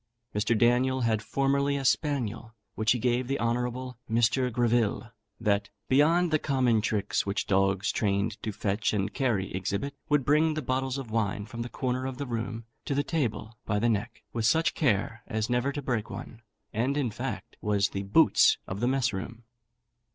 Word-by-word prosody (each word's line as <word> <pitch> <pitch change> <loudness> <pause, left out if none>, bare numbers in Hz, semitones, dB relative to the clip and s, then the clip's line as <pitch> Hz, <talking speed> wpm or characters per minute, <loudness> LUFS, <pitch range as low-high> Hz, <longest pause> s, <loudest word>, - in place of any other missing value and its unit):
Mr. 110 +2 +1
Daniel 125 +3 +3
had 110 -2 +1
formerly 140 +4 +1
a 135 - -4
spaniel, 115 -6 0 0.2
which 110 0 +1
he - - -1
gave 125 +1 0
the 135 +1 -1
honourable 125 +1 -2
Mr. 120 +3 +2
Greville, 120 -1 +1 0.3
that, 105 -3 +1 0.2
beyond 160 +6 +4
the 155 - +3
common 130 -7 +2
tricks 105 -2 0
which 100 +1 -1
dogs 95 0 +2
trained 105 +1 -1
to 110 - -3
fetch 100 +2 -1
and 100 -2 -1
carry 115 -9 0
exhibit, 100 +9 -2 0.2
would 145 -3 +2
bring 155 +2 +3
the 155 - -3
bottles 130 +1 -1
of 130 -5 -6
wine 105 -2 -1
from 115 +2 -7
the 120 - -4
corner 130 0 -2
of 130 -1 -5
the 140 - -3
room 115 -1 -4 0.2
to 140 - -2
the 145 - +2
table 120 -7 -2
by 105 - +1
the 120 +3 +2
neck, 105 -3 -2
with 115 -2 -1
such 160 +7 +3
care 115 -4 0
as 110 +2 -2
never 125 +3 +1
to 145 0 -5
break 120 -5 -1
one; 115 - -8 0.3
and, 130 +6 0
in 130 -6 0
fact, - - -5
was 100 -1 +1
the 100 - -4
boots 100 0 +5
of 95 - -5
the 120 - +1
mess 130 -3 +1
room. 115 +5 -6
120 Hz, 185 wpm, -28 LUFS, 110-130 Hz, 0.3 s, boots